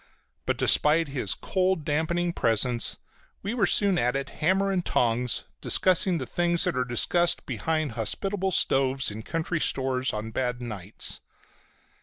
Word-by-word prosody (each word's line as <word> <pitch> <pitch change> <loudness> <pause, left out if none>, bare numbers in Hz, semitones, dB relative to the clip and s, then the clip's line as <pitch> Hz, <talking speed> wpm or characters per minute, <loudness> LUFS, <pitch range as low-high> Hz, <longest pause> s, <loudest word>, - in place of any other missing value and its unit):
But - - 0
despite 155 +1 +3
his 135 -2 -1
cold, 185 -4 -1
dampening 170 +3 -1
presence 115 -1 0 0.5
we 200 +4 -3
were 225 -6 +1
soon 200 -2 +4
at 125 +2 0
it, 135 +1 -4
hammer 190 +5 +2
and 185 -2 -1
tongs, 120 -2 0 0.2
discussing 185 -1 +3
the 130 - -4
things 175 +4 +1
that - - +1
are 130 - +1
discussed 170 +8 +2
behind 155 -3 -2
hospitable 190 - -2
stoves 135 - +1
in 105 +2 -7
country 165 +6 -3
stores 130 -2 0
on 110 +1 -5
bad 125 +1 -2
nights. 105 -5 -4
150 Hz, 145 wpm, -26 LUFS, 125-175 Hz, 0.5 s, soon